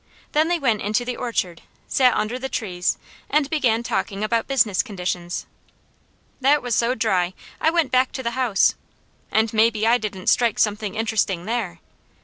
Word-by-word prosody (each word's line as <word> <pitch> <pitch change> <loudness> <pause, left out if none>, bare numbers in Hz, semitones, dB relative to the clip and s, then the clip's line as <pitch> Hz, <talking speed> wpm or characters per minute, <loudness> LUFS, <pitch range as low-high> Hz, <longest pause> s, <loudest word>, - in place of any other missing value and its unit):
Then 310 +2 +3
they 350 0 +1
went 235 -9 +1
into 215 +4 0
the 250 0 -3
orchard, 185 -8 -2 0.3
sat 255 -2 +3
under 230 +4 -1
the 265 +1 -4
trees 180 -8 -1 0.3
and 290 0 +2
began 240 -7 +1
talking 200 -3 -2
about 230 +1 0
business 225 -8 +2
conditions. 180 -5 -4 0.9
That 280 +1 +3
was 245 -1 -2
so 235 +3 +2
dry 190 -6 0 0.2
I 320 - +3
went 330 -5 +1
back 255 0 +3
to 260 - -5
the 235 - -1
house. 240 -5 +2 0.6
And 220 0 +2
maybe 220 0 +3
I 235 +2 +4
didn't 195 -4 -5
strike 235 -3 +3
something 210 -1 0
interesting 215 -5 0
there! 215 -7 -3
225 Hz, 165 wpm, -22 LUFS, 205-255 Hz, 0.9 s, I